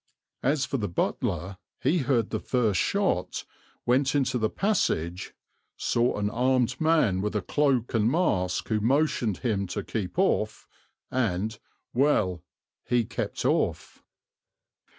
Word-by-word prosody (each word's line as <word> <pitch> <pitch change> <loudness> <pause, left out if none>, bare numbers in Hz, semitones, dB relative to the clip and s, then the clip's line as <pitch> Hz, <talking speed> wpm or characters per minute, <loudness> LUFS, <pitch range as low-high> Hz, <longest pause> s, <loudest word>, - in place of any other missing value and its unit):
As 135 +1 +1
for 135 - -2
the 105 -4 -2
butler, 85 +2 -2 0.2
he 175 - +2
heard 125 -5 +1
the 110 - -1
first 110 -7 +1
shot, - - 0 0.4
went 130 +3 +2
into 130 -3 +1
the 110 -1 +1
passage, 90 - -1 0.4
"saw 120 +1 +1
an 105 0 0
armed 125 +3 +1
man 155 - +3
with 105 +1 -2
a 105 - +1
cloak 135 -3 +1
and 110 -1 +3
mask 105 - 0
who 110 -1 +2
motioned 130 - +1
him 100 -4 0
to 90 - -4
keep 100 -5 -4
off," - - +1 0.4
and 110 -3 -1 0.3
well, 105 - +2 0.4
he 120 0 +1
kept - - -4
off. - - 0
115 Hz, 130 wpm, -27 LUFS, 100-135 Hz, 0.4 s, man